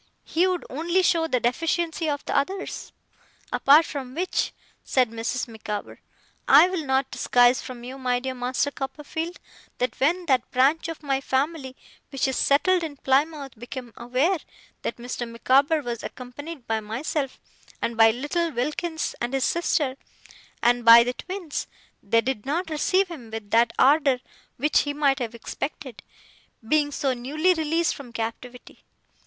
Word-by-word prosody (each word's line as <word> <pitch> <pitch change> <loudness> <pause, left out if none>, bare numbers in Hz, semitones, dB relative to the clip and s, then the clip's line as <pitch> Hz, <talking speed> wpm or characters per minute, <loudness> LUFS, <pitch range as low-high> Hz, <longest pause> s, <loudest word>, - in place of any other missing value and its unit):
He 345 +3 +2
would 365 -2 -1
only 340 +7 0
show 330 -2 +2
the 255 -5 +1
deficiency 325 +6 0
of 285 0 -3
the - - -2
others. 380 +8 -2 0.6
Apart 295 +4 +6
from 265 -3 -6
which,' 365 +3 -1 0.3
said 250 -4 +2
Mrs. 230 +3 -3
Micawber, 215 -2 -6 0.5
'I 360 - +8
will 340 -6 -3
not 265 0 +1
disguise 245 +1 +3
from 245 -2 -9
you, 260 +2 -8
my 250 -1 0
dear 260 +1 -4
Master 255 +3 -1
Copperfield, 305 +5 -5 0.4
that 250 -2 -2
when 345 +6 +2
that 260 -5 +1
branch 275 +6 +2
of 330 -1 -7
my 270 -2 0
family 270 0 -1 0.3
which 275 -1 0
is 265 - -1
settled 355 +9 +3
in 300 -3 -5
Plymouth, 280 +1 0
became 245 0 -8
aware 260 +10 0 0.4
that - - -4
Mr. 240 0 -5
Micawber 275 +6 +2
was 235 -2 -4
accompanied 265 +3 -8
by 225 0 0
myself, 260 +6 -3 0.4
and 230 - -2
by 225 0 +7
little 295 +9 -1
Wilkins 310 +6 -2
and 240 +3 -1
his 265 - +1
sister, 295 -5 0 0.7
and 240 0 +3
by 230 0 +10
the 245 +1 -2
twins, 365 0 -5 0.3
they 230 +3 +2
did 250 -4 -3
not 325 +5 -2
receive 370 +5 +2
him 265 -10 -9
with 220 -2 -7
that 230 0 +4
ardour 280 -1 +4 0.4
which 295 +4 +3
he 290 - -1
might 280 -2 +2
have 235 -2 -4
expected, 260 +1 -6 0.7
being 295 +2 +2
so 275 -2 0
newly 300 +9 +1
released 325 0 0
from 270 -5 -10
captivity. 230 +2 -7
270 Hz, 155 wpm, -25 LUFS, 245-315 Hz, 0.7 s, by